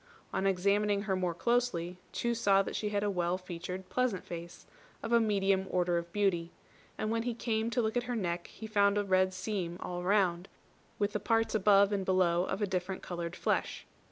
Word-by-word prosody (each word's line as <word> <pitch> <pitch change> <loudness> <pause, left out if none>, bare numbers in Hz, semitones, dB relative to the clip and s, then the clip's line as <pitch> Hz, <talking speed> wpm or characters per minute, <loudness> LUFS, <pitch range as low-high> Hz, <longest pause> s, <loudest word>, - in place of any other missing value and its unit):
On 195 - +1
examining 200 +2 +2
her 195 -3 0
more 180 -2 -1
closely, 185 -6 0
Chu 235 0 -1
saw 200 -4 +3
that - - -5
she 210 - -1
had 205 -1 -1
a 205 - +1
well 175 -1 0
featured 180 +1 -6
pleasant 250 -7 -1
face, 170 0 -8 0.4
of 230 - -2
a 235 - +7
medium 195 -3 +1
order 175 -1 +1
of 170 0 -9
beauty; 180 -4 +1 0.5
and 215 0 -2
when 230 0 +1
he 240 0 -2
came 225 -1 -1
to 240 0 0
look 220 +1 -1
at 245 0 0
her 245 - 0
neck, 175 -5 -2
he 220 - -10
found 205 -1 +3
a 205 - +2
red 185 -1 +3
seam 185 -2 -3
all 175 0 -4
round, 185 -2 +2 0.5
with 205 0 0
the 210 - 0
parts 225 +2 +1
above 200 -1 +5
and 200 -2 0
below 185 -2 +2
of 195 +2 -2
a - - +4
different 185 -1 -3
coloured 170 -1 -4
flesh. - - -1
195 Hz, 205 wpm, -31 LUFS, 180-215 Hz, 0.5 s, a